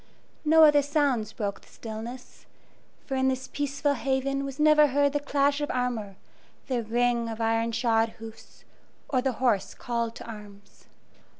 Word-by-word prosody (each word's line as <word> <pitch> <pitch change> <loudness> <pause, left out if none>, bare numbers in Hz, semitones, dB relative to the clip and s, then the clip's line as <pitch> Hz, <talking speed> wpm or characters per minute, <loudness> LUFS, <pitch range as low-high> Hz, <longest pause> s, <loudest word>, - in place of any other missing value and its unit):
No 320 +1 +6
other 295 -1 +6
sounds 280 -7 0
broke 200 -3 -4
the - - -21
stillness, 230 +3 -9 0.6
for 270 - -5
in 265 0 +1
this 260 0 -1
peaceful 285 0 -1
haven 275 +1 -1
was 275 +1 -6
never 300 0 +6
heard 285 +1 +2
the 290 - +1
clash 285 0 +1
of 290 - -2
armor, 240 -6 -2 0.5
the 250 -3 -1
ring 235 +1 0
of 225 0 -6
iron 225 0 +1
shod 230 -1 +1
hoofs, 225 0 -12 0.5
or 255 -3 +1
the 265 0 0
hoarse 230 -5 0
call 235 -1 -2
to 225 - -11
arms. 205 -3 -12
250 Hz, 160 wpm, -27 LUFS, 225-280 Hz, 0.6 s, No